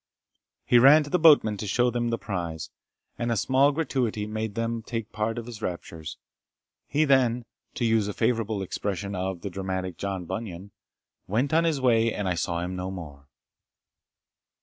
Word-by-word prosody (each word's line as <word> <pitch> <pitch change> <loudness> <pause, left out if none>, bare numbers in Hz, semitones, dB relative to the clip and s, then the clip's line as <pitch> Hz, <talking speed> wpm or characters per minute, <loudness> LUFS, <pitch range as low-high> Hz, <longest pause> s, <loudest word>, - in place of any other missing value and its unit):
He 120 - +5
ran 145 +5 +8
to 145 - -10
the 180 - +2
boatmen 145 -10 +6
to 105 - -5
show 120 +5 +2
them 120 0 -1
the 115 - 0
prize, 85 -7 -5 0.5
and 120 0 -1
a 115 - +1
small 135 +6 +3
gratuity 130 -8 -1
made 110 -1 -4
them 115 0 -2
take 115 -1 -5
part 110 +2 -2
in 115 - -4
his 115 -3 -9
raptures. 85 -3 -5 0.7
He 150 +3 +2
then, 125 -4 +3 0.3
to 120 - -1
use 110 -2 +2
a 105 - -3
favourite 110 -4 0
expression 100 +1 -3
of 95 -2 -3
the 100 - -5
dramatic 95 -1 -4
John 95 -3 -3
Bunyan, 100 0 -6 0.6
"went 125 +9 0
on 165 +1 +4
his 160 -4 +1
way, 115 -3 +3
and 105 -3 -3
I 90 - +1
saw 85 0 -2
him 90 +1 -4
no 90 0 -4
more." 75 -7 -9
110 Hz, 175 wpm, -26 LUFS, 95-120 Hz, 0.7 s, ran